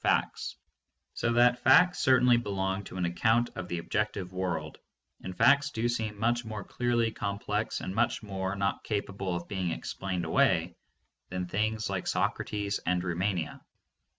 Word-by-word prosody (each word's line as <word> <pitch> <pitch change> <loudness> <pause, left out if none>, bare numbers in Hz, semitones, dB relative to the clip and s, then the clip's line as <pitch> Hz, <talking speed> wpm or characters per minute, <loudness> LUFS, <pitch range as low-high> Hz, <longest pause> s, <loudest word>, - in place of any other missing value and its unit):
513 - - +4
facts, - - -7 0.6
so 120 - 0
that 120 +1 +4
facts 180 +9 +5
certainly 125 -3 +5
belong 100 -3 -2
to 95 - -8
an 90 - 0
account 110 +8 +2
of 90 - -5
the 85 - -3
objective 95 +1 -2
world, 90 -2 -3 0.4
and 95 0 -7
facts 140 0 +5
do 115 -3 -1
seem 110 -3 -2
much 120 +3 +1
more 110 -3 -6
clearly 120 0 0
com 100 -2 -3
plex 105 +2 -2
and 95 - -4
much 115 +2 +1
more 95 -1 -3
not 100 0 -1
capable 100 -3 -2
of 85 0 -5
being 95 -2 -2
explained 90 +1 -3
away 85 +1 +2 0.5
than 90 0 -3
things 110 +4 -1
like 95 -2 -3
Socrates 100 -1 -1
and 90 -1 0
Rumania. 90 -1 -2
100 Hz, 160 wpm, -29 LUFS, 95-115 Hz, 0.6 s, facts